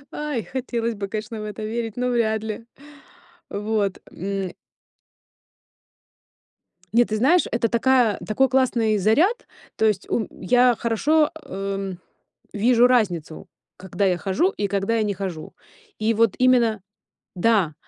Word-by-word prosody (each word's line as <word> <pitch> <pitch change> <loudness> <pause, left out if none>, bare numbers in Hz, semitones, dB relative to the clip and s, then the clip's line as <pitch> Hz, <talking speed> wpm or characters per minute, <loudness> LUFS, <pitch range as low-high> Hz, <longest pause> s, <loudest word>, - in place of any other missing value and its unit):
Ой, 295 -7 -3
хотелось 235 +1 -3
бы, 200 -1 -5
конечно, 215 +1 -5
в - - -5
это 215 +1 -6
верить, 225 0 -4
но 250 0 0
вряд 220 -3 0
ли. 220 +1 -6 0.8
Вот. 205 -1 -1
М. 195 0 -4 2.4
Нет, 240 0 +4
ты 215 - -1
знаешь, 315 +10 +4
это 235 -1 +1
такая 240 -2 +3
такой 265 +5 +2
классный 240 -5 +2
заряд, 310 - +2 0.3
то 220 - +2
есть, 210 -3 0
у 220 - 0
я 245 +5 +3
хорошо, 295 +7 +2
эм, 195 -1 -4 0.6
вижу 235 +3 +4
разницу, 180 -11 0 0.3
когда 190 +1 -2
я 180 -2 +2
хожу 200 - +1
и 205 - -2
когда 200 +3 -1
я 220 - +1
не 205 -2 -2
хожу. 180 -5 -6 0.4
И 220 +1 +1
вот 225 -2 +2
именно 240 -5 +3 0.6
да, 185 -5 +2
220 Hz, 135 wpm, -23 LUFS, 200-240 Hz, 2.4 s, Нет